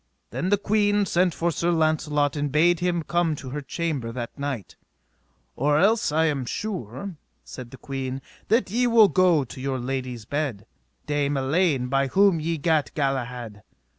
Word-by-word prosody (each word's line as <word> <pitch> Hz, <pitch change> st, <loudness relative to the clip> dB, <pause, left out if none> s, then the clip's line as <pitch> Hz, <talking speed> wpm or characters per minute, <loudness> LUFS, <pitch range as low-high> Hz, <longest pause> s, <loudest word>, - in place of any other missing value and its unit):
Then 180 Hz, -, -2 dB
the 205 Hz, -, +4 dB
queen 205 Hz, 0 st, +2 dB
sent 180 Hz, 0 st, +2 dB
for 170 Hz, 0 st, 0 dB
Sir 170 Hz, +2 st, -1 dB
Launcelot 155 Hz, -3 st, +1 dB
and 145 Hz, -1 st, -2 dB
bade 165 Hz, +3 st, +4 dB
him 175 Hz, -2 st, 0 dB
come 170 Hz, -1 st, 0 dB
to 130 Hz, -3 st, -8 dB
her 145 Hz, +2 st, -4 dB
chamber 140 Hz, -4 st, -3 dB
that 120 Hz, -1 st, -6 dB
night: 140 Hz, -9 st, -5 dB, 0.8 s
Or 145 Hz, +3 st, +2 dB
else 210 Hz, +1 st, +3 dB
I 160 Hz, +2 st, +2 dB
am 145 Hz, -4 st, 0 dB
sure, 170 Hz, -, -5 dB, 0.3 s
said 60 Hz, -, -9 dB
the 130 Hz, -, -11 dB
queen, 135 Hz, -1 st, -4 dB, 0.3 s
that 225 Hz, -3 st, +2 dB
ye 245 Hz, +3 st, +2 dB
will 225 Hz, -3 st, +6 dB
go 175 Hz, -3 st, +4 dB
to 130 Hz, +1 st, -10 dB
your 135 Hz, 0 st, -1 dB
lady's 125 Hz, -2 st, -4 dB
bed, 140 Hz, -6 st, -3 dB, 0.4 s
Dame 145 Hz, -1 st, 0 dB
Elaine, 140 Hz, 0 st, +1 dB
by 135 Hz, +2 st, +1 dB
whom 195 Hz, +3 st, +4 dB
ye 165 Hz, +1 st, -1 dB
gat 150 Hz, -4 st, +1 dB
Galahad. 125 Hz, -6 st, -2 dB
150 Hz, 165 wpm, -25 LUFS, 130-175 Hz, 0.8 s, will